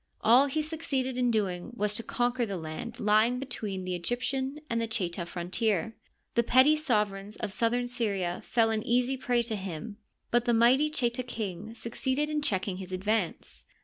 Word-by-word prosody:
All 250 +5 +6
he 305 +3 -1
succeeded 295 -5 -2
in 250 -1 +2
doing 205 -1 -1
was 210 -3 0
to 220 - -1
conquer 245 +1 0
the 200 -4 -2
land 155 -1 -6
lying 215 +4 +3
be 270 - -4
tween 205 -7 -4
the 185 0 -3
Egyptian 260 - -2
and 230 -3 -1
the 230 - -1
Cheta 180 -6 -2
frontier. 200 +5 -1 0.4
The 235 - +4
petty 260 +6 +5
sovereigns 210 -8 -1
of - - -4
southern 240 +4 +1
Syria 200 -8 -1
fell 225 -2 +2
an 220 -1 0
easy 245 +4 +1
prey 245 -2 +1
to 225 -1 -2
him, 195 +2 -6 0.3
but 240 0 +3
the 240 -2 +3
mighty 255 +6 +5
Cheta 245 -4 0
king 220 -3 -5
succeeded 260 +6 -2
in 300 0 0
checking 190 -7 -1
his 190 -1 -8
advance. 190 0 -1
230 Hz, 180 wpm, -29 LUFS, 200-250 Hz, 0.4 s, All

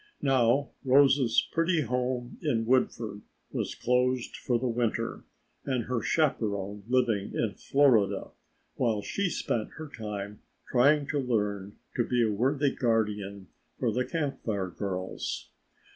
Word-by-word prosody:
Now 135 0 +3
Rose's 135 -3 +4
pretty 165 0 +2
home 125 -1 -2
in 115 -1 0
Woodford 115 -4 +1 0.3
was - - -3
closed 125 0 +1
for 120 - 0
the 125 +2 -1
winter 115 -1 -1 0.4
and 130 -4 -1
her 125 0 -2
chaperon 105 - 0
living 120 -5 +1
in 110 -3 0
Florida 115 -9 +2 0.5
while 110 -4 +1
she 200 -2 -1
spent 115 -8 -2
her 160 -1 -6
time 105 -2 -6 0.3
trying 140 +4 +4
to 145 - 0
learn 105 -5 -1 0.2
to 120 - +2
be 120 0 +1
a 110 - +2
worthy 135 +6 +2
guardian 105 -5 -1 0.3
for 120 - +1
the 125 +4 0
Camp 150 -2 -3
Fire 100 -5 -2
girls. 95 0 -4
120 Hz, 130 wpm, -29 LUFS, 105-130 Hz, 0.5 s, Rose's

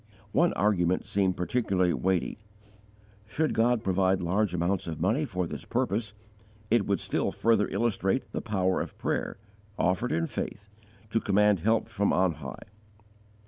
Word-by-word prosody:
One 170 +8 +3
argument 95 -4 +1
seemed 95 -2 +1
particularly 90 -3 +1
weighty: 95 +1 -1 0.9
Should 155 +8 0
God 115 0 +2
provide 95 -1 +2
large 95 +3 +1
amounts 90 +2 -1
of 80 -2 -5
money 110 - +1
for 90 -8 -2
this - - -6
purpose, 105 +1 -1 0.6
it 115 -4 +3
would 100 - +1
still - - -1
further 110 -3 +2
illustrate 115 0 -1
the - - -3
power 95 -3 0
of - - -7
prayer, - - -2 0.4
offered 90 -4 +1
in 80 +1 +1
faith, 105 +4 -5 0.4
to 115 - +2
command 105 -2 +3
help 110 +5 +1
from 100 -3 0
on 95 -1 +3
high. 70 -5 -9
100 Hz, 145 wpm, -28 LUFS, 90-110 Hz, 0.9 s, One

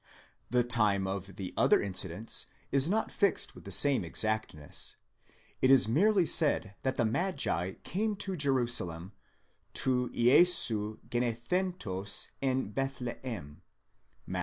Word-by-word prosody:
The 125 0 +2
time 105 -5 +1
of 95 0 -5
the 95 -2 -6
other - - +4
incidents 95 +2 -2 0.2
is 140 +3 +3
not 220 +3 0
fixed 200 -2 0
with - - -14
the - - -8
same 140 -7 +3
exactness; 110 -5 -2 0.7
it 130 - +4
is 135 -4 +7
merely 185 - +3
said 140 -11 +2
that 130 0 -1
the 120 - +1
magi 110 - -1
came 210 +3 -2
to 195 -1 -4
Jerusalem, 120 - 0 0.6
τοῦ 125 -2 +1
Ἰησοῦ 120 -5 +3
γεννηθέντος 120 - -2
ἐν 130 -5 -1
Βηθλεὲμ 125 - -5 0.7
(Matt. 90 0 -4
120 Hz, 120 wpm, -30 LUFS, 100-140 Hz, 0.7 s, is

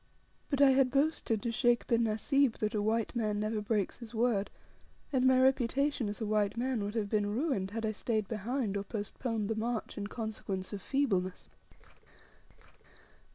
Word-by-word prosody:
But 280 -2 +1
I 275 -1 +8
had 265 -1 +4
boasted 275 -6 +1
to 235 - -1
Sheikh 240 0 +2
bin 235 -1 +2
Nasib 230 +4 +2
that 215 0 -1
a 210 - 0
white 225 +3 0
man 215 -3 0
never 215 0 -1
breaks 210 0 -1
his 235 -1 -10
word, 220 -3 +1 0.6
and 260 -1 +3
my 260 0 +5
reputation 265 -1 +2
as 205 - -5
a 220 - -2
white 210 0 +1
man 245 -3 0
would 205 +2 -4
have 215 -3 0
been 205 0 +1
ruined 245 - 0
had 225 +2 -3
I 215 - 0
stayed 215 -1 -1
behind, 220 +1 -2
or 200 - -2
postponed 215 +1 -3
the 225 - 0
march, 225 0 -3
in 205 - -3
consequence 210 -4 -4
of 200 - -5
feebleness. 195 -10 -1
225 Hz, 175 wpm, -32 LUFS, 210-250 Hz, 0.6 s, I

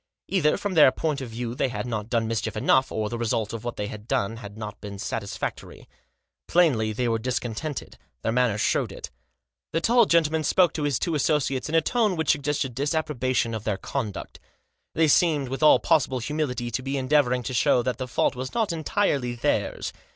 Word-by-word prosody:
Either, 175 -6 +2
from 205 -2 -3
their 150 -6 +7
point 150 -2 -2
of 130 - -6
view, 115 +1 -4
they 130 +1 0
had 125 - -4
not 110 -2 -4
done 115 -2 +1
mischief 110 0 -2
enough, 130 +4 +3
or 110 -1 -1
the 120 +2 -5
result 110 -2 -1
of 115 - -6
what 120 -1 -4
they 105 - -3
had 105 +1 -8
done 100 +1 -1
had 105 -2 -10
not 105 -1 -7
been 100 -1 -7
satisfac 100 0 -3
tory. - - -13 0.6
Plainly, 135 -11 +3
they 120 +3 -1
were 115 -1 +1
discontented. 125 +4 -4 0.2
Their 115 - 0
manner 120 -3 +2
showed - - 0
it. - - -8 0.6
The 165 - +2
tall 235 +4 +4
gentleman 160 -1 +2
spoke 180 +2 +3
to 155 - -3
his 140 -4 +1
two 170 - -2
associates 145 -2 0
in 160 - -1
a 165 - +5
tone 215 +1 +1
which 160 -3 +2
suggested 145 -3 -1
disapprobation 130 -4 -1
of 110 -2 -4
their 105 -3 -1
conduct. 110 -3 -5 0.6
They 160 -1 +4
seemed, 150 -4 +3
with 135 +3 -4
all 155 - +7
possible 145 -5 +2
humility, 125 -2 -2
to 125 - -2
be 135 +1 -3
endeavouring 130 -2 +2
to 130 - -4
show 120 0 +3
that 125 +1 -2
the 130 - -3
fault 125 - +1
was 130 +1 -6
not 220 -6 +1
entirely 145 -7 0
theirs. 120 - -1
130 Hz, 200 wpm, -25 LUFS, 115-155 Hz, 0.6 s, their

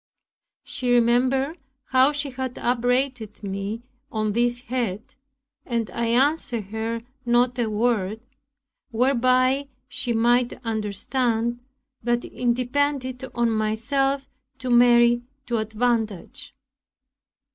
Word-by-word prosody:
She 250 -3 -2
remembered 255 +6 +2 0.3
how 260 +2 +5
she 290 -1 -3
had 260 -1 -4
upbraided 245 -2 0
me 200 +3 -4 0.3
on 215 -1 -1
this 240 +1 +1
head, 235 -5 -3 0.5
and 230 -5 -2
I 235 0 -1
answered 255 -1 +2
her 225 +1 -3 0.2
not 245 +1 +2
a 230 -2 +1
word, 215 -2 0 0.7
whereby 255 +2 +2 0.2
she 245 - -4
might 240 +2 +3
understand 225 +2 -1 0.4
that 240 +1 0
it 245 -1 0
depended 260 0 -1
on 235 -1 +2
myself 265 +6 0 0.3
to 255 -1 -3
marry 240 0 +6 0.2
to 240 -1 -1
advantage. 220 -3 -2
240 Hz, 105 wpm, -24 LUFS, 225-255 Hz, 0.7 s, marry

